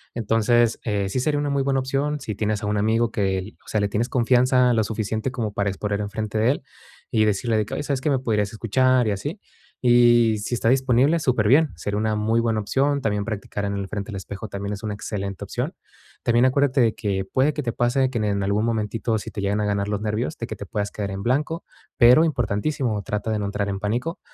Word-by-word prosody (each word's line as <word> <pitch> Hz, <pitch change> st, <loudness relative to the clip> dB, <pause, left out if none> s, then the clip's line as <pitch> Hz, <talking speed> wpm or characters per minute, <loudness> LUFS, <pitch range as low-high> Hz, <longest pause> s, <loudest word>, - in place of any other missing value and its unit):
Entonces, 115 Hz, +1 st, +2 dB
eh, 100 Hz, -3 st, -1 dB
sí 130 Hz, -, -1 dB
sería 145 Hz, +3 st, +1 dB
una 145 Hz, 0 st, -1 dB
muy 140 Hz, -1 st, +1 dB
buena 135 Hz, 0 st, +1 dB
opción 140 Hz, +3 st, -1 dB
si 110 Hz, -, -5 dB
tienes 105 Hz, +1 st, -2 dB
a -, -, -1 dB
un 105 Hz, 0 st, 0 dB
amigo 115 Hz, +2 st, +1 dB
que, 95 Hz, -1 st, -1 dB
o -, -, -26 dB
sea, 110 Hz, -, 0 dB
le 100 Hz, -1 st, 0 dB
tienes 115 Hz, +5 st, -1 dB
confianza, 125 Hz, 0 st, +3 dB
lo 110 Hz, -1 st, +2 dB
suficiente 110 Hz, +3 st, -2 dB
como 115 Hz, -5 st, -3 dB
para 100 Hz, -1 st, 0 dB
exponer 100 Hz, +1 st, -2 dB
en 100 Hz, -, -4 dB
frente 110 Hz, +1 st, -3 dB
de 115 Hz, +3 st, +3 dB
él 140 Hz, -, -4 dB, 0.5 s
y 110 Hz, -3 st, +3 dB
decirle 110 Hz, +2 st, +1 dB
de 105 Hz, -, +1 dB
que: -, -, -5 dB
"Oye, 145 Hz, -, -3 dB
¿sabes 140 Hz, -3 st, -2 dB
qué?, 150 Hz, -, 0 dB
me 135 Hz, -, +3 dB
podrías 105 Hz, -5 st, 0 dB
escuchar" 125 Hz, +3 st, +2 dB
y -, -, +1 dB
así, 145 Hz, -, -4 dB, 0.4 s
y 120 Hz, -2 st, +5 dB
si 105 Hz, +4 st, -2 dB
está 115 Hz, 0 st, +1 dB
disponible, 135 Hz, +4 st, +3 dB
súper 120 Hz, -7 st, +1 dB
bien, 150 Hz, +5 st, +5 dB
sería 100 Hz, +5 st, -3 dB
una 110 Hz, 0 st, 0 dB
muy 110 Hz, +2 st, +1 dB
buena 115 Hz, -2 st, +1 dB
opción. 140 Hz, +7 st, +1 dB
También 105 Hz, -4 st, -1 dB
practicar 105 Hz, -2 st, -4 dB
en 100 Hz, 0 st, -2 dB
el 100 Hz, -1 st, -4 dB
frente 100 Hz, -1 st, -5 dB
del 105 Hz, -, -5 dB
espejo 100 Hz, +2 st, -7 dB
también 100 Hz, +1 st, -4 dB
es 100 Hz, -, -7 dB
una 105 Hz, -2 st, -3 dB
excelente 100 Hz, -2 st, -5 dB
opción. -, -, -4 dB, 0.5 s
También 120 Hz, +1 st, +3 dB
acuérdate 135 Hz, 0 st, +3 dB
de 115 Hz, -2 st, +2 dB
que 95 Hz, -3 st, -2 dB
puede 140 Hz, +3 st, +2 dB
que 150 Hz, -, -3 dB
te 120 Hz, -3 st, -2 dB
pase 130 Hz, +2 st, +1 dB
que 125 Hz, -, -3 dB
en 105 Hz, -2 st, 0 dB
algún 100 Hz, +3 st, +1 dB
momentito, 110 Hz, 0 st, -1 dB
si -, -, -7 dB
te -, -, -7 dB
llegan 100 Hz, +1 st, 0 dB
a -, -, 0 dB
ganar 100 Hz, 0 st, 0 dB
los 105 Hz, -1 st, -2 dB
nervios, 110 Hz, +8 st, -2 dB
de 115 Hz, -, -4 dB
que 110 Hz, -, -5 dB
te 100 Hz, -, -8 dB
puedas 105 Hz, +1 st, -3 dB
quedar 100 Hz, -1 st, -4 dB
en 95 Hz, 0 st, -5 dB
blanco, 150 Hz, +8 st, -1 dB, 0.3 s
pero 125 Hz, +7 st, +7 dB
importantísimo, 120 Hz, -3 st, -1 dB
trata 105 Hz, +2 st, -3 dB
de 110 Hz, -, 0 dB
no 100 Hz, -, -2 dB
entrar 100 Hz, 0 st, -2 dB
en 95 Hz, -, -3 dB
pánico, 120 Hz, -, -2 dB
110 Hz, 240 wpm, -23 LUFS, 105-125 Hz, 0.5 s, pero